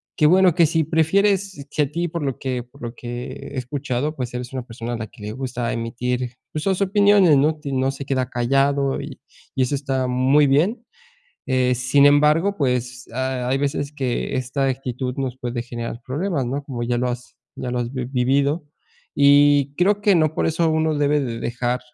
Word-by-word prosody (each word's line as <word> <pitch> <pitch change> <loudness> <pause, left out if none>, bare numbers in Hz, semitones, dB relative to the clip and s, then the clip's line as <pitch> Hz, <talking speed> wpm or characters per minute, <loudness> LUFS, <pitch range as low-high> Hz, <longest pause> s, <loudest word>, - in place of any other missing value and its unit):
que 150 - +2
bueno, 180 0 +5
que 170 - +5
si 160 +1 +1
prefieres 190 +2 +1
que 150 - +1
a 140 - -4
ti 170 +2 -1
por 170 -2 -4
lo 135 -3 -2
que 130 -2 -3
por 125 +4 -21
lo 120 0 -6
que 120 0 -6 0.2
he 135 - -6
escuchado, 135 +2 -2
pues 125 -3 -4
eres 125 0 -5
una 130 -2 -4
persona 115 0 -6
a - - -2
la 110 -1 -5
que 105 - -18
le 105 - -4
gusta 125 -1 -3
emitir, 120 +1 -3 0.2
pues 155 - -3
sus 190 0 0
opiniones, 200 -4 +5
¿no?, 155 +2 +2
no 135 -1 0
se 140 0 -7
queda 130 -2 -1
callado 135 +3 +1
y 140 -1 -9 0.4
y 130 - +2
eso 130 - -1
está 135 -2 -1
muy 130 +4 +3
bien, 185 - +2 0.6
eh, 125 -1 +2
sin 130 +3 +3
embargo, 150 +7 +3
pues 125 -2 -1
ha 130 0 -2
hay 135 +1 +1
veces 140 0 -2
que 130 -1 -2
esta 130 +2 -1
actitud 130 -1 -3
nos 130 -2 -3
puede 120 -1 -3
generar 120 0 -6
problemas, 145 0 -1
¿no?, 140 +4 -3
como 125 -4 -5
ya 120 0 0
lo 125 +1 0
has 125 0 -6 0.2
ya 125 - -4
lo 125 - -1
has 120 +2 -3
vivido, 135 +4 0 0.5
y 145 0 +5
creo 200 +3 +2
que 205 -2 +4
no 155 -2 +2
por - - +1
eso, 165 0 +1
uno 160 -1 +1
debe 145 0 +2
de 115 -3 -4
dejar, 120 +1 -2
135 Hz, 200 wpm, -22 LUFS, 125-150 Hz, 0.6 s, bueno